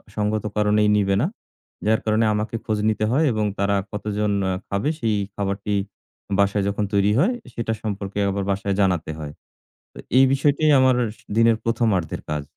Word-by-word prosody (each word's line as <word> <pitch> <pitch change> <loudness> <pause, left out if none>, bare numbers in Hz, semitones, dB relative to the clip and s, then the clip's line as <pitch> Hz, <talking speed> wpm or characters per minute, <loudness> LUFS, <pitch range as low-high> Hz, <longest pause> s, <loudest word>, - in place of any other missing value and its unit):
সঙ্গত 105 0 -1
কারণেই 105 0 +3
নিবে 100 -1 +2
না। 160 - +2 0.6
যার 110 +1 +3
কারণে 110 +1 +2
আমাকে 105 +2 -2
খোঁজ 110 -3 -1
নিতে 110 0 0
হয় 150 +5 +3
এবং 110 -1 0
তারা 100 0 +2 0.2
কতজন 105 0 -2 0.2
আ - - +1 0.2
খাবে, 100 +9 -1
সেই 110 -5 +1 0.2
খাবারটি 100 +1 -2 0.7
বাসায় 100 0 +2
যখন 100 +1 -1
তৈরি 100 +1 +3
হয় 215 - +3 0.2
সেটা 115 -1 -2
সম্পর্কে 100 -1 -4
আবার 100 0 -2
বাসায় 100 0 -1
জানাতে 90 -5 +1
হয়। 75 -1 -6 0.6
তো - - -13 0.2
এই 135 - +7
বিষয়টি 145 +2 +1 0.2
আমার 130 -1 +4 0.2
স - - -21 0.2
দিনের 115 -1 +5
১ম 115 0 +1
আর্ধের 80 - -5
কাজ। 75 -1 -2
105 Hz, 170 wpm, -22 LUFS, 100-110 Hz, 0.7 s, এই